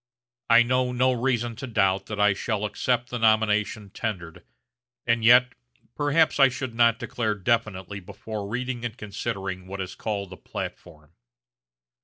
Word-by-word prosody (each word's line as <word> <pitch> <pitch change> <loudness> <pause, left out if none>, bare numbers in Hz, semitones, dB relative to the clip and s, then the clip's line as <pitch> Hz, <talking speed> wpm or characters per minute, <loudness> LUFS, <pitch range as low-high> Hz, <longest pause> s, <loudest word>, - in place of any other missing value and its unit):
I 115 +1 +7
know 125 +1 +1
no 130 +1 +2
reason 120 -2 -1
to 130 - -6
doubt 95 -4 +1
that 105 -1 -5
I 105 -1 +5
shall 105 +1 -2
accept 120 +3 -1
the 125 - -3
nomination 110 -2 +1
tendered 90 -9 -5 0.6
and 115 -1 +1
yet, 125 +2 +6 0.4
perhaps 145 +2 +2
I 135 -1 +7
should 125 -1 -5
not 115 -1 +4
declare 115 -3 -2
definitely 100 -2 -1
before 100 +2 -7
reading 125 +1 -3
and 120 -1 -4
considering 100 -4 -5
what 100 +1 -6
is 95 -1 -4
called 100 -3 -4
the 95 - -9
platform. 75 -2 -8
110 Hz, 150 wpm, -25 LUFS, 100-120 Hz, 0.6 s, I